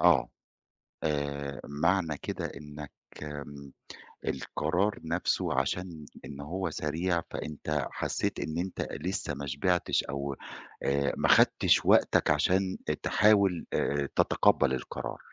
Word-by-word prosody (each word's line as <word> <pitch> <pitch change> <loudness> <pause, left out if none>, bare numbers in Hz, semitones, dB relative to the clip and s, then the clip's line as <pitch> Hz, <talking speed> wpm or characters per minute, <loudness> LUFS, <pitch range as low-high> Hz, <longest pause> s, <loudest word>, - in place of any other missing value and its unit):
آه - - +5 0.8
آآ 70 -2 -2
معنى 80 +2 +1
كده - - -4
إنك 75 0 -8 0.3
إمم 70 -1 -8 0.6
القرار 90 +7 0
نفسّه 85 +2 0
عشان 85 -4 -3 0.2
إن 70 -1 -8
هو 90 +5 -3
سريع 85 +3 -1
فأنت 75 0 -3
حسّيت - - -2
إن 80 +3 -3
أنت 90 +2 -2
لسّه 80 0 -3
ما 70 0 -5
شبعتش 85 +6 +1
أو 70 0 -3 0.5
آآ 70 0 +1
ما - - +1
خدتِش - - +5
وقتك - - +4
عشان 95 0 +2 0.3
تحاول 100 -4 +4
آآ 70 0 +1
ت - - -12
تتقبل 70 -2 +3
القرار. 65 - -4
75 Hz, 115 wpm, -29 LUFS, 70-90 Hz, 0.8 s, آه